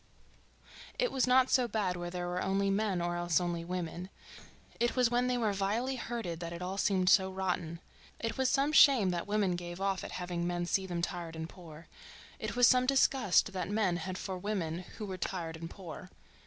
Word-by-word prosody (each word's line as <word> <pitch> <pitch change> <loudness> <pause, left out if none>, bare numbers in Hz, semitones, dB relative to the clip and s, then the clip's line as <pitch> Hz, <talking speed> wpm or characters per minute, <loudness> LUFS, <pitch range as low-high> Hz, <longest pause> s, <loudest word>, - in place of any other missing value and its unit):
It - - +1
was 260 -1 +1
not 255 0 +4
so 250 -2 +4
bad 205 -5 -1
where 175 0 -4
there 175 0 -4
were 180 +1 -2
only 195 +1 +1
men 195 -3 0
or 175 0 -1
else 175 -1 +1
only 175 -1 -2
women; 180 0 -4 0.7
it 240 0 +1
was 250 -2 +3
when 245 +1 +2
they 250 0 +1
were 220 -4 +1
vilely 215 +7 -1
herded 225 -9 -4
that 170 -1 -5
it 170 - -6
all 185 +2 -4
seemed 190 -3 +2
so 190 0 +5
rotten. 180 -3 -2 0.4
It 230 - -3
was 265 -1 +1
some 275 +3 +2
shame 265 -11 +6
that 175 +1 -3
women 205 -3 +1
gave 175 0 -6
off 195 -1 -1
at - - -7
having 175 -1 -3
men 175 0 -1
see 190 +2 0
them 175 -2 -3
tired 170 -2 -4
and 160 0 -5
poor—it 165 -3 -11
was 245 0 +6
some 255 +1 +5
disgust 265 -9 +3
that 180 -1 -3
men 205 -4 +1
had 185 +2 -5
for 190 -2 -5
women 180 -5 -2 0.2
who 215 - -5
were 190 -2 -6
tired 170 -4 -3
and 165 +1 -7
poor. 185 -1 -9
185 Hz, 205 wpm, -32 LUFS, 175-220 Hz, 0.7 s, shame